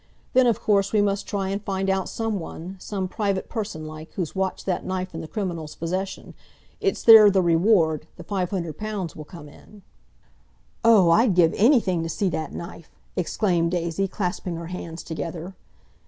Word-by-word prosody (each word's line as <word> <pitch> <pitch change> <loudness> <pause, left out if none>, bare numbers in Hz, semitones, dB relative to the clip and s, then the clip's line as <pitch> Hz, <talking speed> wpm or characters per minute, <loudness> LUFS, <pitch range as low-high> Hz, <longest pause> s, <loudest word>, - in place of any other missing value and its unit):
Then, 255 -1 +5
of 230 -2 +2
course, 200 -3 +2
we 215 - +3
must 200 -1 0
try 195 -2 -2
and 200 +1 -3
find 195 -1 -2
out 190 -1 0
someone—some 190 -2 -4
private 195 0 -2
person 205 -9 -4
like, 155 +1 -9
who's 175 -5 -3
watched 190 -1 -2
that 185 -2 -1
knife 185 -1 -3
in 165 - -5
the 160 - -7
criminal's 170 -6 -4
possession. 185 +4 -4 0.5
It's 395 -2 -1
there 220 -2 +10
the 190 -2 +2
reward—the 165 -2 +2
five 185 -1 -2
hundred 170 -5 -4
pounds 210 -6 -4
will 155 - -8
come 165 -2 -11
in." 200 +7 -17 1.0
"Oh, 210 -7 +6
I'd 215 +1 +4
give 170 -2 +4
anything 215 - +3
to 165 - -3
see 190 +4 0
that 160 -2 -3
knife!" 170 -2 -9 0.3
exclaimed 175 -2 +1
Daisy, 170 +2 -1
clasping 180 -2 -3
her 170 0 -6
hands 165 -2 -7
together. 165 +2 -5
185 Hz, 170 wpm, -24 LUFS, 165-205 Hz, 1.0 s, there